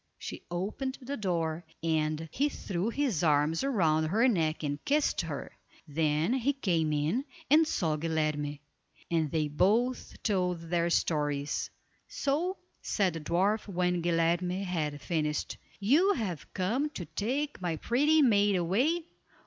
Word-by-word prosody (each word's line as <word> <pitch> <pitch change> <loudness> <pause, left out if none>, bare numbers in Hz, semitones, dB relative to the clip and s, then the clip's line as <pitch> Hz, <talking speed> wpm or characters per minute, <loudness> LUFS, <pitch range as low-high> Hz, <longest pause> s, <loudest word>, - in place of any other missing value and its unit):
She - - -7
opened 210 +10 -3
the 270 +2 -5
door, 170 - -1 0.2
and 155 -1 0
he 285 +3 +1
threw 195 -6 -3
his 235 - 0
arms 150 - +2
round 160 - +2
her 220 +9 +3
neck 160 -9 +1
and 145 0 -3
kissed 295 +1 +2
her, - - -5 0.4
then 155 - +1
he 265 +2 +1
came 170 - 0
in, 150 - 0 0.3
and 315 +1 +6
saw 160 - 0
Guilerme; 155 -2 -1 0.5
and 160 -3 +1
they 155 0 0
both 220 - +1
told 180 -5 +1
their 170 +1 0
stories. 145 -4 0 0.4
"So," 335 +7 -1 0.2
said 190 -5 +1
the 165 - -4
dwarf, 190 +8 +1
when 180 -2 0
Guilerme 175 +2 +1
had 155 -6 -2
finished: 150 -4 -2 0.2
"You 300 - +4
have 190 - -4
come 235 +11 0
to 175 - -4
take 270 - -2
my 175 -3 -1
pretty 295 - +3
maid 205 -5 +4
away? 245 - +1
180 Hz, 140 wpm, -30 LUFS, 160-240 Hz, 0.5 s, and